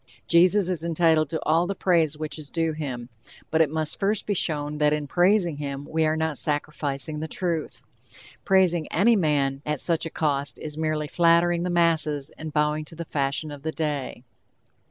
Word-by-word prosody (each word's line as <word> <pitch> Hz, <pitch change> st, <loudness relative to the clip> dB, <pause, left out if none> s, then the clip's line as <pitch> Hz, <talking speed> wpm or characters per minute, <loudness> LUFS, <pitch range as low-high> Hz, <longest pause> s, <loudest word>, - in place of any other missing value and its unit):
Jesus 180 Hz, +3 st, +4 dB
is 175 Hz, -4 st, -2 dB
entitled 160 Hz, -2 st, +2 dB
to 160 Hz, -, -2 dB
all 165 Hz, +3 st, +2 dB
the 200 Hz, -, -3 dB
praise 165 Hz, -6 st, +2 dB
which 155 Hz, 0 st, -5 dB
is 150 Hz, -2 st, -10 dB
due 165 Hz, -1 st, 0 dB
him, 130 Hz, -6 st, -5 dB, 0.4 s
but 160 Hz, -, +3 dB
it 155 Hz, -, +3 dB
must 155 Hz, 0 st, -2 dB
first 200 Hz, +1 st, 0 dB
be 205 Hz, -, 0 dB
shown 150 Hz, -4 st, -1 dB
that 150 Hz, 0 st, +3 dB
in 150 Hz, -1 st, -2 dB
praising 175 Hz, 0 st, +2 dB
him 140 Hz, -1 st, -5 dB
we 160 Hz, 0 st, +1 dB
are 155 Hz, +1 st, 0 dB
not 160 Hz, -2 st, -1 dB
sacrificing 150 Hz, -1 st, -2 dB
the 160 Hz, -, -4 dB
truth. 165 Hz, -1 st, -3 dB, 0.6 s
Praising 180 Hz, -4 st, +3 dB
any 225 Hz, +7 st, +4 dB
man 140 Hz, -6 st, +1 dB
at 150 Hz, -2 st, -2 dB
such 165 Hz, -1 st, 0 dB
a -, -, -6 dB
cost 140 Hz, -5 st, -1 dB
is 150 Hz, -1 st, -7 dB
merely 155 Hz, -1 st, -1 dB
flattering 170 Hz, +1 st, +3 dB
the 180 Hz, -, -2 dB
masses 160 Hz, -4 st, +1 dB
and 160 Hz, 0 st, -7 dB
bowing 150 Hz, 0 st, 0 dB
to 165 Hz, -, -12 dB
the 170 Hz, +1 st, -6 dB
fashion 140 Hz, +1 st, -2 dB
of 145 Hz, -1 st, -9 dB
the 160 Hz, +2 st, -3 dB
day. 150 Hz, -6 st, -3 dB
155 Hz, 190 wpm, -25 LUFS, 150-170 Hz, 0.6 s, Jesus